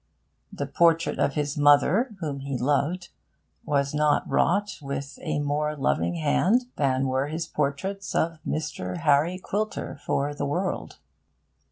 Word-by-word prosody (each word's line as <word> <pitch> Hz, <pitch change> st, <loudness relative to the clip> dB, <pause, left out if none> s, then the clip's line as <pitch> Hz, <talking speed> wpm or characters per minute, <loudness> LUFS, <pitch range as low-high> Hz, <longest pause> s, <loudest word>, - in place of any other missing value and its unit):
The -, -, -4 dB
portrait 165 Hz, -1 st, +2 dB
of 140 Hz, -, +1 dB
his 150 Hz, 0 st, -1 dB
mother, 170 Hz, -, +4 dB
whom 145 Hz, -4 st, -3 dB
he 135 Hz, -1 st, -3 dB
loved, 145 Hz, +7 st, 0 dB, 0.6 s
was 140 Hz, -1 st, 0 dB
not 150 Hz, 0 st, +2 dB
wrought 205 Hz, +4 st, +1 dB
with 140 Hz, 0 st, -5 dB
a -, -, -2 dB
more 150 Hz, +1 st, -1 dB
loving 150 Hz, +4 st, 0 dB
hand 180 Hz, +9 st, +2 dB
than 135 Hz, -2 st, +1 dB
were 130 Hz, +2 st, 0 dB
his 160 Hz, +2 st, -3 dB
portraits 150 Hz, +8 st, -3 dB
of 165 Hz, -1 st, 0 dB
Mr. 155 Hz, +3 st, -3 dB
Harry 160 Hz, +2 st, +3 dB
Quilter 205 Hz, -5 st, -3 dB
for 145 Hz, +1 st, 0 dB
The 145 Hz, 0 st, -3 dB
World. 180 Hz, +7 st, -2 dB
150 Hz, 140 wpm, -26 LUFS, 140-170 Hz, 0.6 s, mother